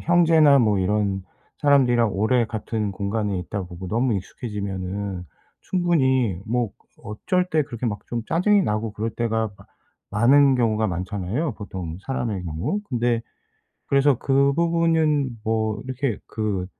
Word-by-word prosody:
형제나 160 -4 +5
뭐 105 -5 +3
이런 100 0 0 0.4
사람들이랑 125 -5 +4
오래 115 +5 +2
같은 110 -1 -3
공간에 100 0 -2
있다 95 +3 -4
보고 90 +1 -8
너무 120 +4 +1
익숙해지면은 100 -2 -4 0.4
충분히 130 - +1
뭐 120 -1 0 0.3
어쩔 180 - -1
때 160 -4 +1
그렇게 125 -4 -5
막 105 -3 -4
좀 120 -1 -3
짜증이 200 +5 +3
나고 105 - -1
그럴 110 +2 -3
때가 110 -1 -1
마 - - -17 0.5
많은 135 +6 +5
경우가 110 -3 +1
많잖아요 95 - -2
보통 90 -6 -6
사람의 115 -8 -3
경우. 85 - -2
근데 120 -2 +1 0.7
그래서 140 0 +4
그 140 +1 +3
부분은 160 -6 +1
뭐 110 -1 0
이렇게 130 -3 -2
그 105 -4 -2
115 Hz, 295 characters per minute, -23 LUFS, 100-140 Hz, 0.7 s, 형제나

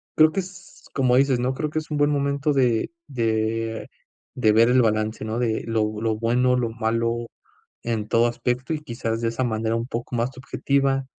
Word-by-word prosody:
creo 155 0 +6
que 195 - -1
es 185 +1 -13
como 130 -2 +3
dices, 135 -1 +3
¿no?, 125 +2 0
creo 150 +3 -2
que 155 - 0
es 155 - -10
un 150 - 0
buen 145 0 +3
momento 140 +1 0
de 125 -5 +2 0.2
de 115 -3 -1 0.5
de 110 - +3
ver 115 +2 +5
el 125 +1 +5
balance, 110 -1 0
¿no?, 110 +2 -2
de 115 -3 0
lo 110 -1 -1
lo 110 -1 +1
bueno, 125 +3 +2
lo 120 -2 0
malo 115 +1 -1 0.6
en 110 -3 -2
todo 115 +1 +4
aspecto 125 +4 -2
y 155 - -3
quizás 115 -5 -3
de 115 - +1
esa 115 +3 -2
manera 110 -1 -1
un 115 +1 -2
poco 120 0 -4
más 120 +2 0
subjetiva, 135 +1 0
120 Hz, 200 wpm, -24 LUFS, 115-135 Hz, 0.6 s, creo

